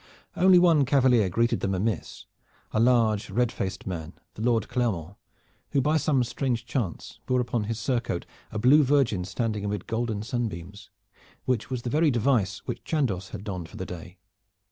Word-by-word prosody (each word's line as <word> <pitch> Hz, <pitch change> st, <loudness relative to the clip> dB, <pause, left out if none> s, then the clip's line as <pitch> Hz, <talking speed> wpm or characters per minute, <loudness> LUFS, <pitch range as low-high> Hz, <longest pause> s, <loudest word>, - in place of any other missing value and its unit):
Only 185 Hz, +1 st, +6 dB
one 170 Hz, -5 st, +5 dB
cavalier 130 Hz, -6 st, +3 dB
greeted 115 Hz, +6 st, +1 dB
them 95 Hz, 0 st, -1 dB
amiss, 100 Hz, -1 st, -3 dB, 0.5 s
a -, -, 0 dB
large, 115 Hz, -3 st, +3 dB
red 120 Hz, -1 st, +1 dB
faced 95 Hz, -1 st, -4 dB
man, 85 Hz, -3 st, -5 dB, 0.2 s
the -, -, -9 dB
Lord 115 Hz, -2 st, +1 dB
Clermont, 100 Hz, -, -2 dB, 0.6 s
who 140 Hz, -, +4 dB
by 150 Hz, +4 st, +2 dB
some 140 Hz, -4 st, +2 dB
strange 120 Hz, -1 st, -2 dB
chance 115 Hz, -, -4 dB
bore 125 Hz, 0 st, +2 dB
upon 120 Hz, -3 st, -1 dB
his 115 Hz, +1 st, -3 dB
surcoat 115 Hz, -6 st, -1 dB, 0.3 s
a 110 Hz, -, -4 dB
blue 130 Hz, +8 st, +6 dB
virgin 130 Hz, -9 st, +2 dB
standing 105 Hz, 0 st, -2 dB
amid 100 Hz, -2 st, -3 dB
golden 115 Hz, -2 st, -2 dB
sunbeams, 105 Hz, -4 st, -5 dB, 0.6 s
which 125 Hz, -2 st, -1 dB
was 125 Hz, -2 st, -3 dB
the 120 Hz, -, -3 dB
very 155 Hz, +1 st, +3 dB
device 115 Hz, -7 st, +1 dB
which -, -, -5 dB
Chandos 105 Hz, -, -1 dB
had -, -, -7 dB
donned 90 Hz, -5 st, -5 dB
for -, -, -11 dB
the 95 Hz, -, -4 dB
day. 90 Hz, +1 st, -9 dB
115 Hz, 170 wpm, -26 LUFS, 100-130 Hz, 0.6 s, Only